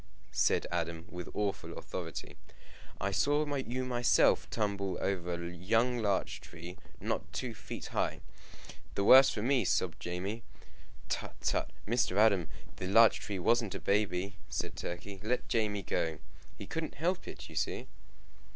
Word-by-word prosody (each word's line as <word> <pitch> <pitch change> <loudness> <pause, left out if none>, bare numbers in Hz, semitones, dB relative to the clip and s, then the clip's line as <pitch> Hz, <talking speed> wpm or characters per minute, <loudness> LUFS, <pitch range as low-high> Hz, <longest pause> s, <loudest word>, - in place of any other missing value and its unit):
said - - +3
Adam, 85 -1 -2
with 90 -2 -6
awful 100 -2 -2
authority, 80 -4 -6 0.6
"I 95 - 0
saw 145 +9 +2
you 130 -1 -2
myself 120 -1 +3
tumble 100 -3 -1
over 90 -3 -1
a 85 0 -5
young 115 +7 +2
larch 100 -4 0
tree, 85 +2 -9 0.2
not - - -2
two 125 -3 -3
feet 110 0 -7
high." - - 0 0.7
"The 100 - +1
worse 135 +5 +9
for 105 - -3
me!" 130 -1 +3
sobbed 90 -2 +1
Jamie. 95 +6 -3 0.7
"Tut! - - -3
tut! - - 0 0.2
Mr. 115 -4 +1
Adam! 100 -6 +5 0.3
the 90 - -3
larch 115 +3 +6
tree 100 - -4
wasn't 110 +2 +2
a - - -3
baby," 100 +1 0
said - - -3
Turkey. 95 +3 -5
"Let 120 +4 -1
Jamie 105 -3 0
go. 80 -1 -1 0.4
He 100 - -7
couldn't 160 +8 -4
help 180 +5 -1
it, - - -8
you 80 - -12
see." 75 - -1
100 Hz, 150 wpm, -32 LUFS, 90-115 Hz, 0.7 s, worse